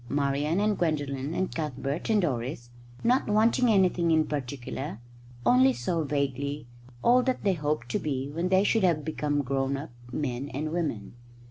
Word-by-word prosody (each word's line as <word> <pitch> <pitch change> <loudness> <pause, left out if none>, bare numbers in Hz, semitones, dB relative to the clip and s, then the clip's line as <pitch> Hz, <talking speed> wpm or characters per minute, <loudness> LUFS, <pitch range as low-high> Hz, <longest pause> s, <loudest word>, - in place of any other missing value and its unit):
Marian 145 +4 0
and 210 0 +1
Gwendolen 145 -2 -1
and 185 - -1
Cuthbert 145 - -3
and 215 -3 +3
Doris, 120 -4 -3 0.3
not 250 +3 +3
wanting 225 +4 +3
anything 185 -4 +3
in 160 -1 +4
particular, 135 -3 -5 0.5
only 130 +2 +5
saw 145 +8 -1
vaguely 140 0 -2 0.4
all 250 +1 +5
that 255 0 -1
they 195 - +3
hoped 150 -6 -2
to - - 0
be 135 -3 -2
when 170 +5 -2
they 190 +1 +4
should 220 0 +2
have 165 -5 +2
become 150 -2 -1
grown 135 +1 -1
up 145 0 -7 0.2
men 135 0 -3
and 155 +2 -2
women. 155 -12 -3
150 Hz, 160 wpm, -28 LUFS, 135-175 Hz, 0.5 s, only